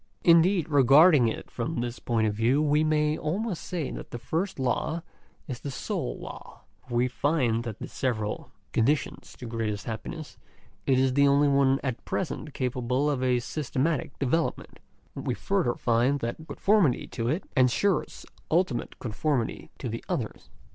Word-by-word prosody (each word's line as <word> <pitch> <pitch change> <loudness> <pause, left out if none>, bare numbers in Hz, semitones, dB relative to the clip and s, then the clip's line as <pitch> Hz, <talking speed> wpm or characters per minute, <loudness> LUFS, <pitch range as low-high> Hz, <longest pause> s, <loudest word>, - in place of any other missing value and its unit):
Indeed, 170 0 +5
regarding 145 -1 +6
it 110 - -4
from 125 +6 -3
this 120 0 -4
point 115 -2 0
of 105 - +1
view, 115 +6 +2
we 150 0 +3
may 155 -1 +2
almost 185 +4 -2
say 170 -7 -3
that - - -7
the - - -5
first 165 +11 -2
law 135 +5 -1 0.4
is 125 -4 -5
the 145 - -5
sole - - -3
law; - - -10 0.3
for 120 - -4
we 120 +1 +3
find 125 -4 +1
that - - -2
of - - -38
the - - -6
several 110 -5 -2 0.2
conditions 135 +6 0
to 125 - -8
greatest 115 -3 -3
happiness 145 +8 -6 0.5
it 130 - +4
is 130 0 +3
the 140 +1 +5
only 140 +1 +4
one 140 -1 +3
at 130 -4 -3
present 155 -5 -4
capable 130 +2 0
of 135 -3 -2
a 125 -1 +2
systematic 145 +2 -2
development; 140 +5 -1 0.4
and - - -6
we - - +1
further 190 -12 0
find 120 +4 +2
that 120 +7 -4
conformity 195 - +2
to 115 -1 -4
it, 165 +8 0
ensures 130 +9 +1 0.2
ultimate 160 -8 0
conformity 120 +2 -2
to - - -5
the - - -5
others. - - -4
135 Hz, 165 wpm, -27 LUFS, 120-155 Hz, 0.5 s, regarding